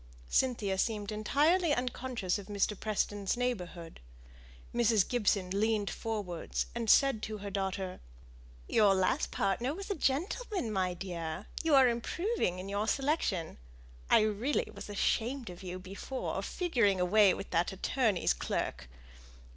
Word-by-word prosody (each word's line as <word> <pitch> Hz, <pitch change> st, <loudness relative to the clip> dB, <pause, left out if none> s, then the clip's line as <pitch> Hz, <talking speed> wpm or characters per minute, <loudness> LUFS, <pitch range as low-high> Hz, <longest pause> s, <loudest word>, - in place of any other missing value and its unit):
Cynthia 210 Hz, -7 st, +1 dB
seemed 210 Hz, -1 st, -1 dB
entirely 295 Hz, +10 st, +2 dB
unconscious 245 Hz, -6 st, -2 dB
of 200 Hz, -, -10 dB
Mr. 205 Hz, 0 st, 0 dB
Preston's 205 Hz, 0 st, -1 dB
neighbourhood. 180 Hz, -9 st, -3 dB, 0.7 s
Mrs. 230 Hz, -4 st, +3 dB
Gibson 200 Hz, -6 st, +1 dB
leaned 210 Hz, +1 st, +1 dB
forwards, 205 Hz, -7 st, -3 dB
and 235 Hz, -2 st, -2 dB
said 275 Hz, -4 st, +5 dB
to 215 Hz, -1 st, -4 dB
her 200 Hz, 0 st, -6 dB
daughter, 190 Hz, -1 st, -3 dB, 0.7 s
"Your 205 Hz, -3 st, +4 dB
last 190 Hz, -1 st, +1 dB
partner 235 Hz, +9 st, 0 dB
was 395 Hz, +2 st, -6 dB
a -, -, 0 dB
gentleman, 340 Hz, -, -1 dB
my 185 Hz, -3 st, 0 dB
dear. 175 Hz, 0 st, -5 dB, 0.2 s
You 320 Hz, -3 st, +3 dB
are 265 Hz, -2 st, +7 dB
improving 245 Hz, -, -1 dB
in 185 Hz, +1 st, -6 dB
your 200 Hz, +2 st, -1 dB
selection. 265 Hz, -, 0 dB, 0.5 s
I -, -, +6 dB
really 215 Hz, +7 st, 0 dB
was -, -, -9 dB
ashamed 230 Hz, +3 st, -1 dB
of 175 Hz, -, -11 dB
you 185 Hz, -1 st, -5 dB
before, 195 Hz, +8 st, -4 dB
figuring 235 Hz, -, +1 dB
away 195 Hz, +2 st, +5 dB
with 195 Hz, -, -8 dB
that 170 Hz, +3 st, +1 dB
attorney's 200 Hz, -, +1 dB
clerk. -, -, -3 dB
210 Hz, 135 wpm, -32 LUFS, 190-250 Hz, 0.7 s, are